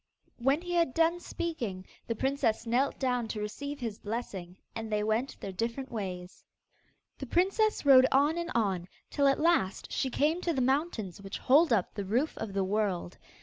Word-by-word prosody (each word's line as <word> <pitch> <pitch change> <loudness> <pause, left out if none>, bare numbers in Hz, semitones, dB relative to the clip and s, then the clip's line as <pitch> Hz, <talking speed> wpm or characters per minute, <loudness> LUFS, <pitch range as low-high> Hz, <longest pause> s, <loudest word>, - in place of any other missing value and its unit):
When 275 +7 +2
he 355 0 -4
had 335 -7 +2
done 330 +1 +3
speaking, 240 - -4 0.2
the 230 - -1
princess 260 -3 0
knelt 245 +4 +1
down 250 -3 0
to 220 - -4
receive 285 +8 -5
his 225 -5 -4
blessing, 195 -5 -5 0.2
and 225 -1 -5
they 210 0 +1
went 220 +5 -1
their 195 - -5
different 235 +7 -3
ways. 185 -5 -6 0.8
The 270 - -5
princess 390 - +1
rode 260 -2 +8
on 285 +4 +4
and 340 0 -3
on, 190 -6 0 0.2
till 280 -1 +3
at 275 - +3
last 315 - +1
she 265 - 0
came 310 +7 +1
to 340 - 0
the 270 - -1
mountains 255 - -1
which 195 0 -6
hold 295 +3 +4
up 205 -6 +1
the 200 - -4
roof 240 +11 0
of 200 - -4
the 195 -1 +1
world. 190 -3 -1
245 Hz, 185 wpm, -30 LUFS, 205-285 Hz, 0.8 s, rode